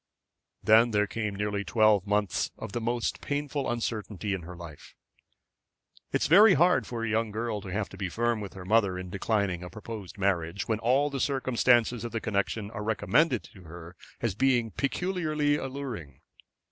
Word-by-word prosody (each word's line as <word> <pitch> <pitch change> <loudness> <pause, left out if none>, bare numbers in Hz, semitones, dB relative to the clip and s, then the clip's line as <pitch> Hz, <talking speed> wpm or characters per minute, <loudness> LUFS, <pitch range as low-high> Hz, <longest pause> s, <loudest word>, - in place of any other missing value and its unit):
Then 110 +2 +6
there 105 -2 +2
came 105 0 -3
nearly 105 0 -2
twelve 110 -3 +3
months 105 -3 0
of - - -7
most 120 +1 -1
painful 145 -1 -2
uncertainty 110 -4 -3
in 95 - -3
her 90 +2 -9
life. 85 -4 -11 1.2
It - - 0
is - - +2
very 195 +6 +7
hard 175 +4 +3
for 115 -2 -4
a - - -2
young 110 +1 0
girl 110 0 -3
to 95 - -10
have 100 +2 -2
to 95 - -12
be 95 -1 -3
firm 115 +3 0
with 100 - -7
her 95 -2 -9
mother 100 -2 +2
in 90 -1 -7
declining 100 -3 0
a 90 - -7
proposed 110 -3 -8
marriage, 95 -2 -1
when 110 -2 0
all 135 +5 +2
circumstances 125 -3 +2
of 120 - -5
the 115 - -1
connection 100 0 -2
are 110 - -6
recommended 120 +5 +2
to 95 -2 -15
her 85 +2 -10 0.3
as 115 -4 0
being 120 0 +2
peculiarly 155 -2 0
alluring. 130 - -6
110 Hz, 170 wpm, -28 LUFS, 100-120 Hz, 1.2 s, very